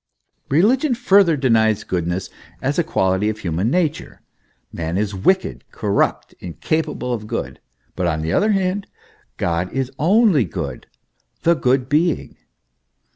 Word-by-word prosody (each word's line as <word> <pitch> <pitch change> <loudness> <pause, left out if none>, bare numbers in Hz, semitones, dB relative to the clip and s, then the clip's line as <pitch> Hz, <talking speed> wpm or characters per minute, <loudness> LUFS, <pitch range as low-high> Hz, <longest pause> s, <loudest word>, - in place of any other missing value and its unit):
* - - -50
Religion 245 - +3
further 200 -9 +4
denies 110 -5 +2
goodness 90 +1 -3 0.3
as 140 +5 -1
a - - +3
quality 95 - +1
of 110 - -3
human 90 +1 -1
nature; 160 0 -1 0.5
man 85 +1 -3
is 105 0 -1
wicked, 185 - 0
corrupt, 100 -2 -1
incapable 135 - -2
of 105 -3 -5
good; - - -4 0.4
but 90 -1 -1
on 80 -2 -1
the 80 - -1
other 215 - +3
hand, 195 +1 -1 0.5
God 85 +1 -1
is 135 -1 -2
only 190 - +4
good 80 -8 -6 0.6
the 170 - +5
Good 130 -4 +1
Being. 155 +3 0
125 Hz, 135 wpm, -20 LUFS, -, 0.6 s, the